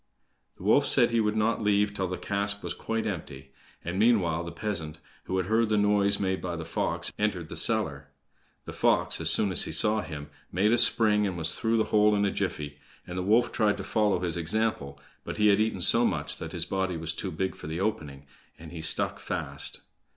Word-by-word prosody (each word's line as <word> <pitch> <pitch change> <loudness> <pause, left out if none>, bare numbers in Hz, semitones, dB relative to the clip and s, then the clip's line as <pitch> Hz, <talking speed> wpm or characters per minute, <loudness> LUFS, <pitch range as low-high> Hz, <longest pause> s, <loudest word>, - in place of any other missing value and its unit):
The - - -12
wolf - - +4
said - - +3
he 115 - +2
would 105 -1 +1
not 110 +1 +1
leave 105 0 +2
till 95 -2 -2
the 90 0 -4
cask 100 0 -1
was - - -3
quite 115 0 -3
empty; 75 -9 -6 0.3
and 85 +3 -3
meanwhile 95 -8 +3
the 85 - -6
peasant, 85 -8 -4 0.3
who 95 - -2
had 95 - 0
heard 110 +3 +2
the 105 - +2
noise 105 -1 +3
made 95 -1 -1
by 90 -1 -3
the 80 -1 -6
fox, 80 - -2
entered 100 -6 -1
the - - -7
cellar. - - -1 0.6
The - - -7
fox, - - +1
as - - +2
soon 100 - +2
as 90 - +3
he - - -5
saw 110 0 +2
him, 75 -5 -8 0.2
made 100 +5 +2
a 120 - +4
spring, 110 -3 +3
and 90 -2 -4
was 80 0 0
through 115 0 0
the 110 - +3
hole 105 0 +5
in 100 0 +2
a 100 - +1
jiffy; 75 -1 -4 0.3
and 90 - -7
the 90 - -2
wolf 110 +6 +3
tried 105 -3 +1
to 100 - -5
follow 105 -3 +1
his 85 -2 -2
example, 85 -6 -1 0.2
but - - -6
he 105 0 +4
had 100 0 +4
eaten 110 -4 0
so 115 +7 +3
much 75 -9 -1
that - - -7
his - - -3
body 95 -2 -2
was 80 0 -2
too 95 - -4
big 95 +3 -2
for - - -10
the 80 +2 -4
opening, 75 -9 -3 0.3
and 80 -1 -11
he 85 -2 -7
stuck 80 +1 +1
fast. - - -4
100 Hz, 225 wpm, -28 LUFS, 85-105 Hz, 0.6 s, hole